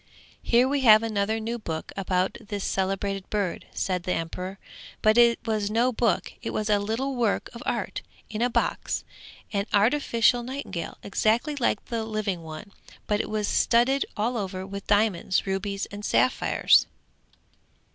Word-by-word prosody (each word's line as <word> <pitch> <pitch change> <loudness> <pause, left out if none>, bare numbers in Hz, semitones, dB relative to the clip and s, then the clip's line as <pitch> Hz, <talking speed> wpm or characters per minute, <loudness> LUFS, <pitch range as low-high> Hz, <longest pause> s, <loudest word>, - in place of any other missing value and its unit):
'Here 245 +2 +3
we 280 +1 0
have 220 -3 +7
another 215 0 0
new 230 +2 -3
book 160 -6 -5
about 185 -1 0
this 205 -2 -5
celebrated 195 0 -2
bird,' 200 -5 -2
said 185 -2 -1
the 180 +1 -1
emperor. 180 +4 -4 0.5
But 215 0 +5
it 235 0 +6
was 215 -2 0
no 235 +4 +2
book; 230 0 0
it - - -4
was 215 0 -1
a 205 - +4
little 230 +7 -2
work 230 -4 0
of 235 - -9
art - - -2 0.3
in 215 0 -5
a 245 - +3
box, - - -1 0.5
an 200 +1 0
artificial 235 +2 +3
nightingale, 255 -8 -5
exactly 225 +8 +1
like 240 -6 0
the 230 -2 -3
living 215 -5 -2
one, 160 +4 -9 0.3
but 210 0 +1
it - - -7
was 210 -1 -1
studded 250 +4 +3
all 230 +4 0
over 190 -2 -4
with 200 0 -7
diamonds, 205 -3 +2
rubies 195 +1 -2
and 205 +1 -7
sapphires. 255 - +3
215 Hz, 155 wpm, -26 LUFS, 195-235 Hz, 0.5 s, have